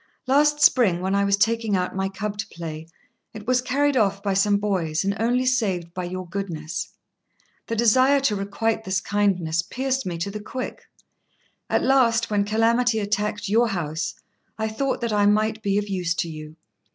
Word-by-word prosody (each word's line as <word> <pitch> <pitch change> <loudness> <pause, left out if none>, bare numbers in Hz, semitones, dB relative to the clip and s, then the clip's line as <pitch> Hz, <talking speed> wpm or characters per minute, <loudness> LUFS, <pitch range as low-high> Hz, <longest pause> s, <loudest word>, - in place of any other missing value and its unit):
Last 295 +3 +3
spring, 200 -9 +4
when 190 +2 -1
I 200 0 +2
was 200 0 +2
taking 225 0 +1
out 180 0 -1
my 190 0 -1
cub 205 +2 -4
to - - -3
play, 160 -1 -7 0.5
it 210 -1 -8
was 250 +1 +2
carried 280 +3 +1
off 200 -4 +1
by 200 -2 0
some 200 +1 +3
boys, 185 -6 -1
and 200 0 0
only 245 +3 +1
saved 195 -10 0
by 180 -1 -4
your 185 +1 -5
goodness. 170 -4 -4 0.8
The 230 - -2
desire 255 +5 +4
to 240 -6 +1
requite 210 +3 -1
this 190 -2 0
kindness 185 -6 0
pierced 265 +4 -2
me 175 -2 -3
to 170 +4 -3
the 210 - -5
quick. 255 +5 -6 0.8
At - - +1
last, 235 -4 +3
when 205 -1 +2
calamity 225 +2 +2
attacked 210 0 -1
your 230 +4 +3
house, 160 -5 -3 0.4
I 220 0 -1
thought 260 +5 -2
that 235 -2 -1
I 205 -1 +3
might 215 +1 +1
be 200 -1 0
of 205 0 -1
use 180 -4 -1
to 170 - -2
you. 155 -1 -9
205 Hz, 185 wpm, -23 LUFS, 185-230 Hz, 0.8 s, spring